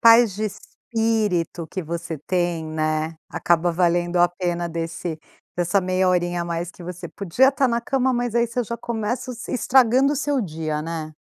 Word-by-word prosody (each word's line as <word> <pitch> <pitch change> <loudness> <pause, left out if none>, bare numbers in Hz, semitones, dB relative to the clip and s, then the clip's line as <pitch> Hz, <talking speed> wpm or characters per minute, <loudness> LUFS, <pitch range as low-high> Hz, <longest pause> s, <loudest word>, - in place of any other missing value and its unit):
Paz 230 -3 +7
de 215 - -1
espírito 210 -6 -1
que 185 +3 -5
você 165 0 -4
tem, 175 +1 -1
né, 155 0 -1
acaba 170 0 +1
valendo 175 0 +1
a 175 0 +6
pena 175 -1 -2
desse 165 0 -4 0.4
dessa 175 +3 +2
meia 185 0 +1
horinha 175 -1 +1
a - - -4
mais 170 0 -3
que - - -13
você 180 +1 -6
podia 200 +7 +2
estar 270 -1 +2
na 235 0 +1
cama, 260 +1 +1
mas 240 -1 -1
aí 235 - +4
você 240 +1 -1
já 235 +2 -4
começa 235 +2 -3
o - - -5
se 235 - -7
estragando 260 +2 +4
o - - -1
seu 285 -1 0
dia, 155 -4 -3
né. 160 -1 -5
180 Hz, 185 wpm, -23 LUFS, 170-235 Hz, 0.4 s, Paz